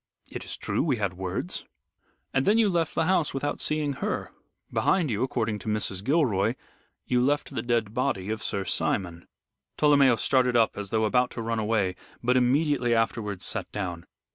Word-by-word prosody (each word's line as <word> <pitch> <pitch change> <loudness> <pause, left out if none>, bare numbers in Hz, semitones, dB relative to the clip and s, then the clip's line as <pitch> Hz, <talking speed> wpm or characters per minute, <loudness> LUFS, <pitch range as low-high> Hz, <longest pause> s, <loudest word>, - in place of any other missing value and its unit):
"It - - -6
is - - -4
true, - - -1
we 140 -6 +1
had 100 -3 -1
words." 90 0 -3 0.7
"And 135 - +2
then 210 +2 +5
you 225 -3 +4
left 170 -3 0
the - - +2
house 170 -6 +1
without 145 +2 -2
seeing 150 -2 +1
her. - - -3 0.4
Behind 175 -8 +2
you, 105 +1 -1
according 110 -5 -1
to - - -11
Mrs. 105 -3 -1
Gilroy, 120 - +2 0.5
you 125 -1 +2
left 145 +2 0
the - - -2
dead 115 -3 0
body 115 -6 -1
of 110 - -3
Sir 100 -1 -2
Simon." 85 -3 -2 0.5
Tolomeo 140 -4 +5
started 125 +4 +2
up 115 -1 +3
as 100 -1 -4
though 110 +1 +1
about 125 +3 +2
to - - -2
run 115 0 -1
away, 105 -4 0 0.3
but 125 +1 +2
immediately 130 -1 +2
afterwards 105 -4 -1
sat - - -1
down. 90 -4 -5
120 Hz, 180 wpm, -27 LUFS, 105-140 Hz, 0.7 s, then